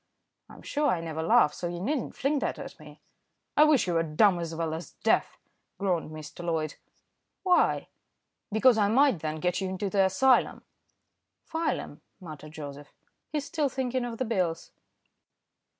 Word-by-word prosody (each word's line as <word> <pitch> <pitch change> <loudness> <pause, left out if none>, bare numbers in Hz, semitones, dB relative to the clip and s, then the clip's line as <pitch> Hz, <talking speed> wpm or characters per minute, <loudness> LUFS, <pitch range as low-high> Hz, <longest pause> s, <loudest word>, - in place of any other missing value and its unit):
"I'm - - -14
sure 295 0 0
I 180 - +2
never 160 -1 -4
laugh, 150 -2 +4
so 175 - -4
you 175 0 -5
needn't 265 - -2
fling 285 +2 0
that - - -2
at - - -9
me." - - -14 0.5
"I 300 - +7
wish 305 -4 +4
you 180 - -1
were 165 - +3
dumb 175 +4 +3
as 165 -1 -4
well 165 -1 -2
as 165 +2 -7
deaf," - - +2 0.4
groaned 180 -6 -1
Mr. 155 +2 -9
Loyd. 160 -3 -1 0.7
"Why?" 360 -2 +3 0.6
"Because 220 +2 +4
I 205 - +4
might 260 - +4
then 155 0 -3
get 180 +3 0
you 190 - -2
into 190 +1 -3
the 195 -2 +4
asylum." 245 +7 +3 0.8
"File 325 +1 -1
'em," - - -10 0.2
muttered 155 -4 -10
Joseph. 145 -2 -9 0.4
"He's 295 -2 -2
still 300 -3 0
thinking 255 -1 -2
of 235 -1 -5
the 255 - -1
bills." 180 -7 -1
185 Hz, 165 wpm, -28 LUFS, 165-255 Hz, 0.8 s, I